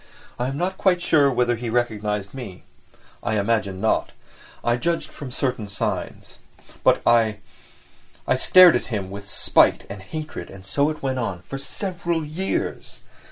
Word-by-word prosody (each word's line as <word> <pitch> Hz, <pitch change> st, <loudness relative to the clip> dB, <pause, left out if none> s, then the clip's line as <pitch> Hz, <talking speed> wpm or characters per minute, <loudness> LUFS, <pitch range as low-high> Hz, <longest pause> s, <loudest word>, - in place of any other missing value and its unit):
I 125 Hz, -, 0 dB
am 135 Hz, +1 st, -3 dB
not 185 Hz, +4 st, -2 dB
quite 185 Hz, -2 st, +3 dB
sure 150 Hz, -5 st, +3 dB
whether 120 Hz, -1 st, +1 dB
he 115 Hz, +1 st, -5 dB
recognised 105 Hz, -4 st, -1 dB
me, 120 Hz, -9 st, -8 dB, 0.6 s
I 110 Hz, -, -1 dB
imagine 100 Hz, -2 st, 0 dB
not; 110 Hz, +2 st, 0 dB, 0.5 s
I 120 Hz, -, +2 dB
judge 165 Hz, +8 st, -1 dB
from 140 Hz, -, -9 dB
certain 125 Hz, -4 st, -2 dB
signs. 95 Hz, -1 st, -4 dB, 0.4 s
But -, -, +4 dB
I—I 110 Hz, -3 st, -2 dB
stared 185 Hz, -2 st, +7 dB
at -, -, -1 dB
him 100 Hz, -5 st, -4 dB
with 100 Hz, 0 st, -8 dB
spite 90 Hz, -, +3 dB
and 100 Hz, -1 st, -7 dB
hatred 155 Hz, +10 st, -7 dB
and 95 Hz, -1 st, -12 dB
so 140 Hz, +9 st, +1 dB
it 155 Hz, -2 st, -6 dB
went 130 Hz, -1 st, -1 dB
on... 95 Hz, -7 st, -3 dB
for 135 Hz, +9 st, -6 dB
several 170 Hz, +1 st, -3 dB
years! 170 Hz, +6 st, -4 dB
120 Hz, 155 wpm, -23 LUFS, 105-150 Hz, 0.6 s, stared